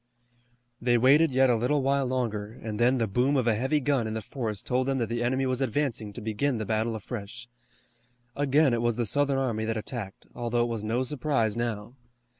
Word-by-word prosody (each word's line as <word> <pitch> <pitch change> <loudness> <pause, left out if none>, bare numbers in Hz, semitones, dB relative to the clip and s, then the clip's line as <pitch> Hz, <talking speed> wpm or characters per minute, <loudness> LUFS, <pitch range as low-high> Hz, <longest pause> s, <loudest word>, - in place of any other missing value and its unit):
They 120 0 +3
waited 140 +6 +5
yet 130 0 +4
a - - +3
little 130 +5 +1
while 135 0 +1
longer, 115 -4 -2
and 110 -1 -4
then 125 +2 +4
the 115 - +1
boom 125 +7 +1
of 130 - +1
a 115 - +3
heavy 130 +7 +1
gun 135 -5 0
in 110 - -4
the 110 - -3
forest 110 -4 -4
told 130 +1 0
them 135 -1 +1
that 115 -4 -1
the 120 0 -2
enemy 130 +3 +1
was 130 0 -1
advancing 125 -4 -1
to - - -7
begin 115 +5 -1
the 110 - -3
battle 110 +2 0
afresh. 115 +2 -7 0.9
Again 145 -1 +3
it 115 - 0
was 120 -1 +1
the 120 0 -1
Southern 140 +3 +1
army 120 -5 -1
that 110 0 -1
attacked, 110 -3 -6
although 120 0 0
it 120 - -2
was 115 -2 -3
no 115 +4 0
surprise 130 -5 0
now. 115 -1 -3
120 Hz, 215 wpm, -27 LUFS, 110-135 Hz, 0.9 s, waited